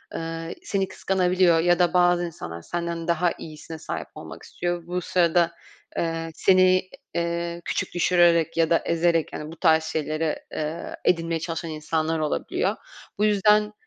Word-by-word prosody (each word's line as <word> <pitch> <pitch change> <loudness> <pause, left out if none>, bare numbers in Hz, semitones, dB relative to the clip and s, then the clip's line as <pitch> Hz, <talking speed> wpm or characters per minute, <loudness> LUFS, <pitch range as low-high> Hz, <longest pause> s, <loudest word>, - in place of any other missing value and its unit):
eee, 165 0 -5
seni 195 -1 -1
kıskanabiliyor 180 -3 +2
ya 175 +1 +3
da 175 -1 +3
bazı 175 -1 +4
insanlar 85 - -7
senden 170 - -4
daha 170 +1 +2
iyisine 160 0 -9
sahip - - -5
olmak - - -10
istiyor. 175 -1 -4
Bu 180 +1 -2
sırada, 170 -1 +2 0.5
eee, 165 0 -2
seni, 185 0 +4 0.3
iii, 170 0 -2
küçük - - -2
düşürerek 170 -2 +3
ya 165 -1 +3
da 165 - +5
ezerek, 170 -1 +1
hani, 150 +1 -6
bu 165 - -9
tarz 160 -2 +4
şeyleri, 155 0 -1 0.2
eee, 155 +2 -4
edinmeye 165 -1 +1
çalışan 165 0 -4
insanlar 155 +1 -1
olabiliyor. 155 -1 -1 0.4
Bu 210 - +2
yüzden, 210 +1 +3
170 Hz, 145 wpm, -25 LUFS, 165-175 Hz, 0.5 s, da